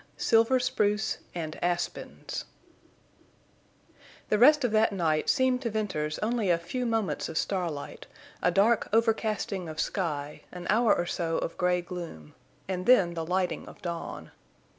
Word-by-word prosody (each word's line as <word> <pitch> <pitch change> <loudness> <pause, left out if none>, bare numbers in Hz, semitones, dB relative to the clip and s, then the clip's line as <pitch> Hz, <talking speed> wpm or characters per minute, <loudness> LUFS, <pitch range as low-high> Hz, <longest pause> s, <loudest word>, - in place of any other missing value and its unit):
SILVER 230 +3 +4
SPRUCE 210 -3 0 0.2
AND 160 -2 -5
ASPENS 175 0 -3 1.8
The 210 - +2
rest 290 +4 +7
of 245 - +1
that 220 0 +3
night 160 -5 0
seemed 260 -2 +2
to 235 - -1
Venters 185 -9 -2
only 225 -3 0
a 170 - +4
few 240 +9 -3
moments 225 -3 -1
of 160 - -4
starlight, 170 -8 -3 0.3
a - - +3
dark 205 +5 +3
overcasting 215 -5 0
of 155 -1 -7
sky, 150 -6 -2
an 180 -1 -8
hour 230 +2 +4
or 175 - -1
so 165 -2 -1
of - - -3
gray 180 -1 +1
gloom, 170 - -8 0.3
and 185 -1 -3
then 195 -9 +5
the 165 -1 -3
lighting 180 +2 -1
of - - -12
dawn. 85 - -5
185 Hz, 145 wpm, -28 LUFS, 170-225 Hz, 1.8 s, rest